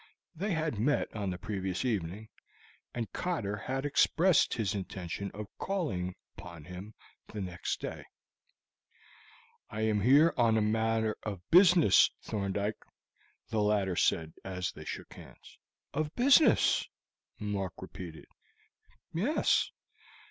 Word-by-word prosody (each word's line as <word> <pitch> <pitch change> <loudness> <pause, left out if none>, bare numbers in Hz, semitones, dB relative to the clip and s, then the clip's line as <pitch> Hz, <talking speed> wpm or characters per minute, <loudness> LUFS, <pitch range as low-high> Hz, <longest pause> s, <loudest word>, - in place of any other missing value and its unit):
They 190 +6 -3
had 160 -9 -1
met 145 +2 0
on 100 -3 -2
the 90 - -3
previous 95 +2 -3
evening, 105 -1 -2 0.6
and 115 -2 -5
Cotter 145 - -2
had 130 +6 -3
expressed 165 +4 +3
his 110 -3 -1
intention 95 0 -5
of 105 +1 -5
calling 95 - -2 0.2
upon 85 -5 -10
him 90 +6 -9 0.3
the 110 - -7
next 90 -3 -3
day. - - -6 1.6
"I 110 - -4
am 110 -2 +1
here 145 +9 +6
on 115 -2 +4
a - - +3
matter 110 0 +1
of 95 -4 -6
business, 180 - +7
Thorndyke," 100 0 -2 0.7
the 110 -2 0
latter 105 -3 +1
said 80 -2 +1
as 95 -1 -3
they 75 - -11
shook - - -7
hands. - - -15 0.3
"Of 150 +1 -2
business!" 270 0 +5 0.5
Mark 100 -3 -3
repeated. 90 -3 -9 0.9
"Yes. 220 - +2
105 Hz, 120 wpm, -31 LUFS, 95-135 Hz, 1.6 s, business